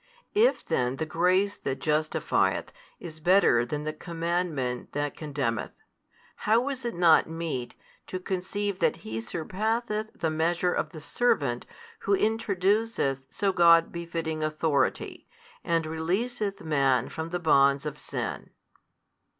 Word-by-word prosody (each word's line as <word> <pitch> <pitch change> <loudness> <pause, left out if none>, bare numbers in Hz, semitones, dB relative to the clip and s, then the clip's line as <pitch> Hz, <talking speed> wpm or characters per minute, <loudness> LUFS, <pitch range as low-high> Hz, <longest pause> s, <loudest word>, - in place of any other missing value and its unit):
If 455 +4 +3
then 125 +1 0
the 160 - -2
grace 185 +5 +2
that 135 - -3
justifieth 155 0 0 0.3
is 160 -2 -9
better 175 -8 +4
than 145 +5 -4
the 155 0 -3
commandment 165 -6 -2
that 145 0 -2
condemneth, 140 -7 -3 0.6
how 230 +5 +2
is 265 -2 -4
it 235 -1 -3
not 170 -2 +5
meet 165 -7 -4 0.3
to 185 - -4
conceive 190 +2 -3
that 165 -3 0
He 110 +1 -4
surpasseth 215 - -2
the 160 - -1
measure 170 +3 +1
of 155 - -1
the 155 -1 -10
servant 145 - 0 0.3
Who 200 - +2
introduceth 205 - +1
so 200 -2 0
God 170 -2 +6
befitting 165 -2 -3
authority, 155 -3 0 0.4
and 165 -1 +1
releaseth 195 +7 -2
man 140 -5 +2
from 160 +1 -5
the 175 - -1
bonds 140 -4 +4
of 150 -1 -5
sin? - - -4
165 Hz, 130 wpm, -27 LUFS, 150-195 Hz, 0.6 s, God